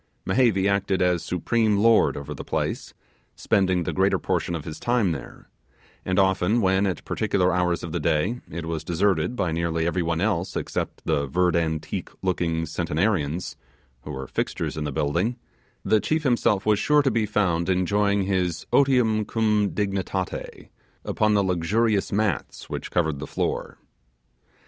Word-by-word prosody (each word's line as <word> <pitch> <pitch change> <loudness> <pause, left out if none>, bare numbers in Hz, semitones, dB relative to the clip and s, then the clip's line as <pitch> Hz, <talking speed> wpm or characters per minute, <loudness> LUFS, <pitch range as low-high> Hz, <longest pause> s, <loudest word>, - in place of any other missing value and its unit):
Mehevi 110 -7 +3
acted 100 -1 +1
as 90 -2 +2
supreme 105 +4 +1
lord 115 +2 +4
over 70 +1 -6
the 70 - -7
place, - - -3 0.4
spending 95 -3 +1
the - - -3
greater 95 +1 +2
portion 85 - -1
of 80 - -6
his 80 - -7
time 120 -7 +1
there: 80 - -8 0.6
and 95 0 -1
often 95 +3 +3
when, 95 -1 +2
at 95 - -4
particular 90 0 +1
hours 90 -1 0
of 85 - -5
the - - -2
day, 95 +11 0
it 85 +1 -5
was 80 -1 -3
deserted 90 +4 +1
by 90 -8 -1
nearly 85 0 -1
every 85 +2 0
one 85 -1 -1
else 95 -2 -1
except - - -4
the 70 0 0
verd 90 +4 +1
antique 80 -2 -2
looking 85 -3 0
centenarians, 85 +1 -1 0.5
who 75 - -11
were 65 -2 -5
fixtures - - -3
in 75 -1 -3
the 75 - -2
building, 85 - 0 0.5
the 110 - +4
chief 155 +7 -1
himself 120 -6 +2
was 105 -1 +3
sure 150 +3 +3
to 135 - +2
be 110 -1 0
found 90 -5 0
enjoying 100 +2 +2
his 90 -3 -1
'otium 125 -6 +3
cum 105 -2 +1
dignitate' 95 -2 -3 0.4
upon 110 -1 +1
the 100 - +3
luxurious 95 +4 +1
mats 100 -5 -2
which - - -4
covered 80 -5 0
the 75 - -6
floor. - - -3
95 Hz, 160 wpm, -24 LUFS, 85-105 Hz, 0.6 s, lord